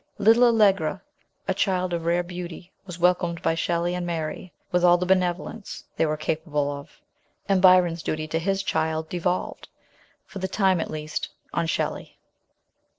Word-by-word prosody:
Little 225 +4 +5
Allegra, 200 -7 +3 0.5
a 190 - +2
child 185 -2 0
of 170 -1 -2
rare 170 +1 +2
beauty, 175 0 -8 0.2
was 180 -2 -7
welcomed 175 -1 +2
by - - +2
Shelley 170 +1 0
and 180 0 -2
Mary 170 +1 -4 0.2
with 180 0 +2
all 175 0 +6
the 180 - -2
benevolence 185 +3 -1
they 160 - +2
were 155 0 -1
capable 155 -2 -1
of, 140 0 -10 0.5
and 195 -2 +3
Byron's 180 -3 +5
duty 155 0 -3
to 160 - 0
his 195 +3 -1
child 160 -3 -1
devolved, 180 +1 -2 0.6
for 195 - -9
the 190 - -2
time 190 -2 +2
at - - -4
least, 155 0 -4 0.2
on 170 -1 0
Shelley. - - -3
175 Hz, 160 wpm, -25 LUFS, 165-185 Hz, 0.6 s, all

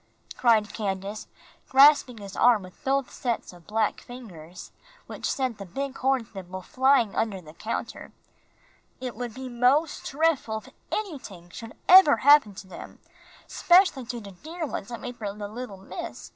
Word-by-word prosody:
cried 220 -4 +3
Candace, 200 0 -4 0.4
grasping 270 -3 +6
his 200 -2 -9
arm 235 -5 +4
with 185 0 -15
both 270 -1 0
sets 235 -6 -3
of 175 -2 -17
black 215 0 0
fingers, 185 -9 -11 0.3
which - - -5
sent 255 -5 -2
the - - -5
big 270 +9 -5
horn 265 -2 +1
thimble 185 -2 -9
flying 260 0 +3
off - - -11
under 215 -4 -1
the 155 -3 -14
counter. 220 +7 -5 0.9
"It 250 -4 -5
would 240 -1 -6
be 260 0 -7
mos' 255 +6 +2
drefful 275 -8 -1
if - - -16 0.2
anyting 250 - -6
should 225 -1 -10
eber 365 -5 +8
happen 285 -9 +6
to 190 - -10
dem, 185 - -11 0.5
'specially 350 -8 +3
to 240 0 -6
der 310 - -7
ones 205 - -6
I 235 - -5
made 245 0 -8
fer 205 -3 -5
de 205 -1 -5
little 220 -1 -8
miss. 190 - -8
235 Hz, 160 wpm, -26 LUFS, 200-270 Hz, 0.9 s, eber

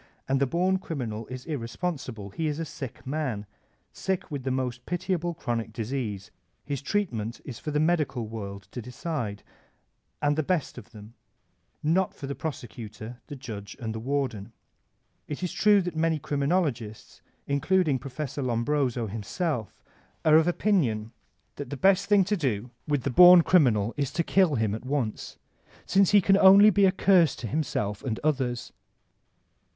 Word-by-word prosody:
And 135 0 +1
the 140 - +3
born 185 +6 +1
criminal 115 - -5
is 130 0 -8
irresponsible; 130 - -4
he 160 +9 -2
is 150 -1 -2
a 165 - -3
sick 140 -5 -8
nian» 130 -7 -2 0.5
sick 190 -3 -3
with 145 -2 -3
the 130 - -3
most 125 -1 -3
pitiable 175 -1 -2
chronic 120 -6 -3
disease; 110 -4 -4 0.3
his 140 -2 -3
treatment 125 - -2
is 125 -5 -7
for - - -5
the 150 0 0
medical 150 -8 +1
world 100 -3 -7
to 125 - -5
decide, 125 - -4 0.8
and 145 0 +1
the 155 - +1
best 160 -1 -1
of - - -15
them, 110 0 -13 0.4
— - - -20
^not 180 +4 +2
for 140 - -7
the 140 - -3
prosecutor, 115 -5 -7
the 145 - -7
judge, 105 -7 -8
and 110 -3 -4
the 110 - -5
warden. 130 -5 -2 0.8
It 150 +4 -5
is 180 - -2
true 205 -2 +4
that 175 -2 -4
many 160 0 +1
criminologists, 140 - -2 0.2
including 145 0 +1
Prof. 135 +2 -6
Lombroso 125 -1 0
himself, 115 - -4 0.4
are 155 -1 +6
of 160 +1 +3
opinion 135 - +1 0.5
that 145 - -6
the 140 - -5
best 190 +4 +3
thing 205 -2 +5
to 210 +3 0
do 125 - -2 0.2
with 145 -4 0
the 140 - -1
bom 180 +3 +9
criminal 120 - +3
is 140 -3 -1
to 170 - +1
kill 180 -4 +3
him 110 -3 0
at 110 - -5
once, 130 -5 -3 0.5
since 195 -1 +4
he 205 -1 +6
can 195 +2 +4
be - - +1
only 200 +1 +7
a 190 - +5
curse 185 -5 +4
to 115 - -7
himself 105 -6 -2
and 115 -5 -2
others. 130 -5 -1
140 Hz, 165 wpm, -27 LUFS, 115-170 Hz, 0.8 s, bom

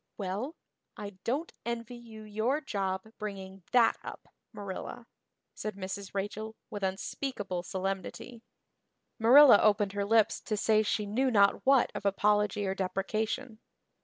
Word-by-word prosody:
"Well, 205 - -3 0.4
I 205 -1 -6
don't 285 +8 -1
envy 235 0 -4
you 225 -2 -11
your 220 +7 0
job 195 -8 -2 0.2
bringing 195 -2 -6
that 245 -2 +5
up, - - -9 0.2
Marilla," 205 +3 -7 0.5
said 215 -2 -5
Mrs. 195 0 -6
Rachel 215 +3 -4 0.2
with 205 - -5
unspeakable 195 0 -3
solemnity. 195 +6 -5 0.8
Marilla 250 +1 +8
opened 205 -2 +3
her 205 0 -1
lips 220 +1 +3
to 215 - -3
say 215 +1 +3
she 210 0 -1
knew 250 +6 +1
not 200 -4 +4
what 270 -2 +5
of - - -5
apology 205 +1 +2
or 190 - 0
deprecation. 215 +5 -2
210 Hz, 130 wpm, -30 LUFS, 195-230 Hz, 0.8 s, Marilla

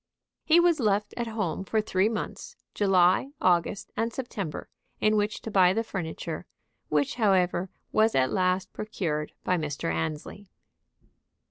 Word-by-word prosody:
He 330 +2 +5
was 345 -2 +4
left 210 -3 +1
at 235 -1 -2
home 210 -5 -2
for 215 +3 0
three 210 -1 +1
months, 220 -2 -5 0.2
July, 195 +6 +3
August, 180 +2 +1
and 230 +1 -1
September, 205 - -5 0.3
in 215 0 +3
which 210 0 -1
to 225 - -5
buy 185 -2 +5
the 225 - 0
furniture; 170 -4 -5 0.4
which, 145 -2 +1
however, 190 -4 +2 0.2
was 220 +1 +3
at 130 -1 +3
last 185 0 0
procured 155 -8 -3
by 180 - +1
Mr. 145 - -2
Annesley. 155 - -4
195 Hz, 140 wpm, -27 LUFS, 175-215 Hz, 0.4 s, He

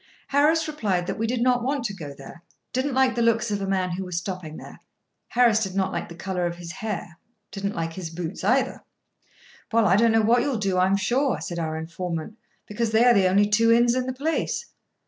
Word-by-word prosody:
Harris 310 +3 +3
replied 205 -12 -1
that - - -4
we 225 - 0
did 240 0 0
not 250 -1 +3
want 275 0 -1
to 210 -4 -2
go 155 -7 -8
there—didn't 250 - -6
like 265 -1 +3
the 235 - -1
looks 230 -1 +2
of 205 -1 -1
a 195 - -2
man 185 -2 0
who 185 +2 -3
was 180 -2 -4
stopping 175 -3 -5
there—Harris 235 -3 -1
did 190 -3 -3
not 190 -1 0
like - - -4
the 170 - -9
colour 180 0 -2
of 170 - -4
his 175 -1 -8
hair, 195 -6 -5 0.3
didn't 200 0 -3
like 165 0 -3
his 175 -2 -6
boots, 170 +2 -6
either. 255 +5 +1 0.9
"Well, 230 -1 +3
I 190 -1 +4
don't 230 +1 +4
know 225 0 +3
what 235 +3 +4
you'll 270 -2 -1
do, 195 -3 0
I'm 190 +2 +3
sure," 250 +7 +1
said 175 -2 -5
our 160 -1 -2
informant; 170 +4 -5 0.3
"because 220 +2 -2
they 220 +2 +4
are 245 - +7
the 195 -3 +4
only 200 +3 +4
two 225 +2 +3
inns 235 +1 +4
in 255 0 -1
the - - -1
place." 305 +5 -2
205 Hz, 220 wpm, -24 LUFS, 180-240 Hz, 0.9 s, are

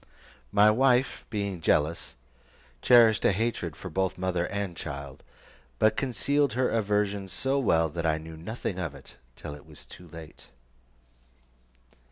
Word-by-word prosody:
My 105 +1 +6
wife 130 +2 +2
being 100 -5 -3
jealous, 80 -2 0 0.7
cherished 115 -4 +6
a - - +4
hatred 95 -6 -2
for 90 - -8
both 95 +2 -1
mother 90 -1 -1
and 100 -3 -4
child, 70 -3 -7 0.6
but 110 - +3
concealed 140 +3 0
her 130 +1 +1
aversion 105 -2 0
so 135 +9 0
well, 80 -10 +2
that 85 +1 -3
I 80 -1 +1
knew 80 +1 -9
nothing 95 +2 -5
of 80 -6 -4
it - - -14 0.2
till 75 - -8
it 75 - -13
was - - -13
too 90 - -13
late. 80 -1 -12
95 Hz, 145 wpm, -27 LUFS, 80-110 Hz, 0.7 s, My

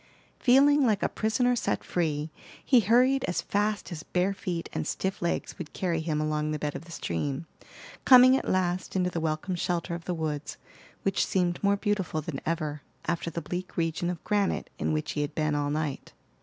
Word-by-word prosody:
Feeling 280 +3 +5
like 215 -5 +2
a - - +4
prisoner 245 +3 +1
set 240 - -1
free, 155 -3 -1 0.3
he 255 - +6
hurried 250 +5 +4
as 175 - -1
fast 205 0 -1
as 160 -3 -5
bare 180 +4 0
feet 175 -3 -4
and - - -2
stiff 190 0 -2
legs 170 - -2
would 165 -3 -7
carry 170 -3 -1
him 155 -1 -1
along 155 0 0
the 155 - -1
bed 150 -1 -3
of 160 - -7
the 170 - -13
stream, 135 - -3 0.6
coming 255 0 +8
at - - -1
last 185 0 0
into 180 -1 +1
the 170 - -2
welcome 160 +4 -2
shelter 175 0 -1
of 170 0 -6
the 180 - -2
woods, 155 -2 -3 0.5
which 195 0 +2
seemed 180 -1 0
more 200 0 +3
beautiful 195 -6 -1
than 150 -2 -5
ever, 155 -3 -2 0.2
after 170 +1 -1
the 170 0 -5
bleak 180 +4 -5
region 165 +1 0
of 175 -3 -5
granite 205 -2 0
in - - 0
which 155 0 -1
he 150 - -2
had 145 +1 -3
been 155 -1 +1
all 145 0 0
night. 150 -2 -3
175 Hz, 195 wpm, -28 LUFS, 155-200 Hz, 0.6 s, coming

